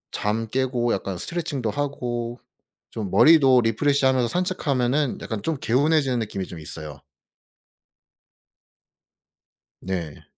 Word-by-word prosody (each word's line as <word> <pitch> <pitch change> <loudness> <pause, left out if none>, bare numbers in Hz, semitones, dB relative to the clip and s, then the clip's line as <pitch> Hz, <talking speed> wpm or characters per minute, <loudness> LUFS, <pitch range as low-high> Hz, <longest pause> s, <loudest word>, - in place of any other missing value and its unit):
잠 110 +2 -1
깨고 125 -1 0
약간 95 -1 -3
스트레칭도 145 - -3
하고 120 -4 -3 0.5
좀 105 -4 -4
머리도 135 - +6
리프레시하면서 130 +2 +2
산책하면은 145 -5 0
약간 110 -2 -4
좀 160 +4 -2
개운해지는 140 0 +2
느낌이 105 -4 -4
좀 85 - -9
있어요. 75 -1 -6 2.8
네. 85 -5 -5
125 Hz, 255 characters per minute, -24 LUFS, 110-145 Hz, 2.8 s, 머리도